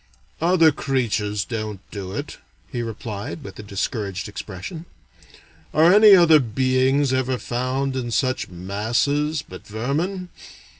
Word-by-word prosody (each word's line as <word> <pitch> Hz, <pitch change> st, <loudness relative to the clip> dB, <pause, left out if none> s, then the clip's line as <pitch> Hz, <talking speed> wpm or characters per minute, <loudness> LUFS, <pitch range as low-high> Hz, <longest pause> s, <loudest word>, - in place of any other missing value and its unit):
"Other 165 Hz, -1 st, +5 dB
creatures 110 Hz, -7 st, -1 dB
don't 110 Hz, -4 st, -4 dB
do 95 Hz, -3 st, -6 dB
it," 145 Hz, +8 st, -6 dB, 0.3 s
he 120 Hz, -3 st, -2 dB
replied, 105 Hz, -6 st, -6 dB
with 95 Hz, 0 st, -10 dB
a -, -, -4 dB
discouraged 100 Hz, -1 st, -3 dB
expression. 105 Hz, -, -7 dB, 0.9 s
"Are 165 Hz, +4 st, +6 dB
any 210 Hz, -1 st, +9 dB
other 165 Hz, -4 st, +7 dB
beings 130 Hz, +3 st, +1 dB
ever 130 Hz, 0 st, 0 dB
found 130 Hz, +3 st, -2 dB
in 125 Hz, -2 st, -3 dB
such 130 Hz, +2 st, 0 dB
masses, 115 Hz, -, -1 dB
but 90 Hz, -, -12 dB
vermin? 155 Hz, -, -2 dB
130 Hz, 120 wpm, -22 LUFS, 105-145 Hz, 0.9 s, any